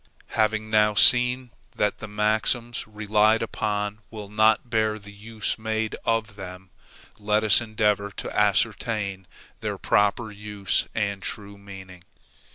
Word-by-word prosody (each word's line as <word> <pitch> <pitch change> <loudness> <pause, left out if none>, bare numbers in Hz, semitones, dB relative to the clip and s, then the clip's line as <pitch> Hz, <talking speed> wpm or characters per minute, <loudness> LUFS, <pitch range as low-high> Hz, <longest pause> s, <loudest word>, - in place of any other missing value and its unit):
Having 110 0 0
now 105 -1 +4
seen 125 +3 +4 0.2
that 105 - 0
the 110 - -7
maxims 110 +3 0
relied 110 +1 +2
upon 105 -1 -2
will 105 -3 -8
not 110 +3 +3
bear 110 -2 0
the 100 -1 -13
use 110 +1 -3
made 110 0 -2
of 115 -3 -1
them, 95 -1 -9 0.5
let 105 +1 +1
us 110 +2 +6
endeavor 105 -2 0
to - - -7
ascertain 100 -4 0 0.3
their - - -3
proper 105 +3 +1
use 105 -3 -1
and 100 -2 -1
true 100 0 -5
meaning. 95 -3 -12
105 Hz, 130 wpm, -25 LUFS, 100-110 Hz, 0.5 s, us